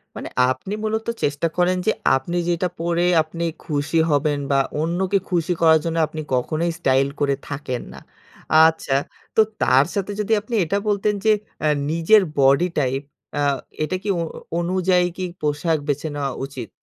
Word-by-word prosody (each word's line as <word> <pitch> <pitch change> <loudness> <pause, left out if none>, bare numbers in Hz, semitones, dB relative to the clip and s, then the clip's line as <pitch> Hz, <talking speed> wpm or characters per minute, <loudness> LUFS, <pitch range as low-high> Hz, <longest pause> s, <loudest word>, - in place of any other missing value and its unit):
মানে - - -6 0.2
আপনি 130 +10 -5
মূলত 220 +1 -2 0.2
চেষ্টা 145 +3 +1
করেন 180 +1 +2
যে, - - +5 0.2
আপনি 170 +7 -2
যেটা 175 +1 +1
পরে 170 +1 0 0.2
আপনি 165 +2 -5 0.2
খুশি 150 +2 -1
হবেন 145 0 +1
বা, 140 - +3 0.3
অন্যকে 185 +4 0
খুশি 175 -1 +1
করার 160 -1 +6
জন্য 165 0 -1
আপনি 155 - -6
কখনোই 155 +7 0
স্টাইল 135 +1 +3
করে 140 -1 +2
থাকেন 135 -3 -4
না। - - -10 0.7
আচ্ছা, 160 -4 -1 0.4
তো - - +7 0.2
তার 135 +3 +5
সাথে 200 0 -2
যদি 210 +1 +1
আপনি 230 +3 -4
এটা 185 +5 0
বলতেন 210 0 +1
যে, 220 - +6 0.3
এ - - +4 0.2
নিজের 170 +6 +5 0.2
বডি 140 +5 +5
টাইপ, 135 0 0 0.4
আ - - +1 0.4
এটা 185 +4 -1
কি 210 - -6
অ - - 0 0.4
অনুযায়ী 180 0 +2
কি 185 - -3 0.2
পোশাক 150 +2 0
বেছে 145 +2 -1
নেওয়া 140 -2 -2
উচিত? 130 -6 -8
165 Hz, 165 wpm, -22 LUFS, 145-185 Hz, 0.7 s, তো